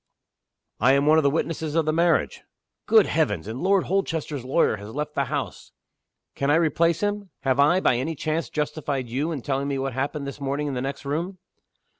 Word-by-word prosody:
"I 125 +5 +5
am 140 +1 +3
one 155 +1 +6
of - - 0
the 140 - +4
witnesses 160 0 -2
of 165 -2 +2
the 155 - +1
marriage." 170 +1 +1 0.5
"Good 220 -3 +6
Heavens! 105 - 0
And 115 +4 -5
Lord 190 0 +3
Holchester's 160 -7 -2
lawyer 130 -3 +2
has 105 +1 -9
left 150 0 -3
the 140 - 0
house!" 140 +1 -5 0.6
"Can 140 - -1
I 145 - +5
replace 165 +1 +2
him? 205 -1 -2
Have 135 0 +1
I, 150 +6 +5
by 125 - +3
any 160 +6 -2
chance 155 +3 -2
justified 145 -3 -2
you 140 +7 -1
in 140 -7 -4
telling 140 0 -1
me 140 -1 -1
what 135 -1 -2
happened 140 +3 -2
this 140 +1 -7
morning 140 +2 -2
in 145 - -2
the 125 - -2
next 135 +1 -5
room?" 170 +7 -3
150 Hz, 205 wpm, -24 LUFS, 135-165 Hz, 0.6 s, one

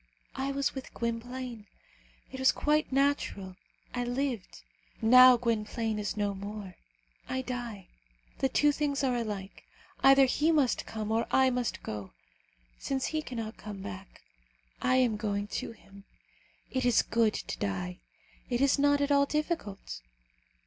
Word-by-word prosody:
I 270 +1 -2
was 275 0 0
with 265 -1 -8
Gwynplaine. 235 -1 -4 0.6
It 265 - -7
was 260 - +5
quite 300 0 +1
natural, 265 -9 0 0.4
I 245 - -1
lived. 245 -4 -3 0.4
Now 255 +2 +8
Gwynplaine 225 -1 -1
is 205 0 -3
no 205 -1 0
more, 200 -1 -7 0.6
I 260 0 -1
die. 240 -6 -5 0.5
The 270 - +2
two 295 +3 +4
things 285 -1 -1
are 255 -2 +2
alike: 205 -4 -4 0.4
either 270 0 +7
he 300 +5 +2
must 290 -6 +2
come 215 -1 -4
or 225 +1 +1
I 265 -1 +4
must 245 -1 -2
go. 105 - -6 0.7
Since 265 -1 -2
he 310 - +1
cannot 230 -5 -6
come 205 -2 -8
back, 195 -2 -9 0.6
I 255 - +3
am 245 -4 +3
going 205 -1 -1 0.2
to - - -6
him. 200 -2 -17 0.7
It 260 0 -1
is 245 -2 +4
good 225 -2 +2
to - - -5
die. 180 -3 -3 0.5
It 240 -1 0
is 275 +1 +3
not 285 0 +4
at 285 0 +1
all 280 0 +4
difficult. 300 - -3
245 Hz, 150 wpm, -30 LUFS, 210-270 Hz, 0.7 s, Now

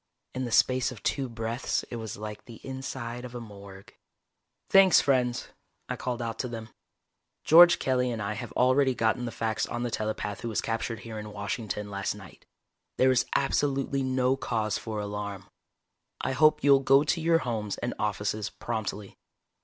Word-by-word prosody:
In 130 0 -2
the 120 - -5
space 130 +3 +3
of 110 -6 -11
two 135 -3 -1
breaths 115 +1 -2
it 120 - -4
was 110 -2 -6
like 105 0 -7
the 115 - -11
inside 130 -2 -5
of 125 -1 -8
a - - -4
morgue. 100 -3 -12 0.7
"Thanks, 195 -1 +7
friends," 125 -3 +1 0.4
I - - -1
called 125 -1 -3
out 115 -1 -4
to 125 - -1
them. 115 -2 -7 0.7
"George 175 +2 +8
Kelly 125 -1 +1
and 115 -2 -3
I 105 +1 -2
have 115 +1 -6
already 130 +1 +3
gotten 115 +2 +1
the 120 - -4
facts 110 -1 -1
on 120 0 -3
the 120 - -2
telepath 105 -2 -3
who 120 - -3
was 110 - -1
captured 115 -1 -3
here 110 -2 -7
in 105 0 -7
Washington 105 0 -4
last 100 0 -2
night. 95 -4 -14 0.5
There 130 0 +5
is 130 - +2
absolutely 140 0 +1
no 130 0 +1
cause 110 -6 -1
for 110 -2 -4
alarm. 100 -2 -5 0.7
I - - -1
hope 155 +3 +4
you'll 140 -1 +6
go 135 +1 +5
to 165 +2 0
your 165 +1 +4
homes 110 -8 -3
and 120 - -3
offices 105 0 -1
promptly. 110 -4 -5
120 Hz, 175 wpm, -28 LUFS, 105-130 Hz, 0.7 s, George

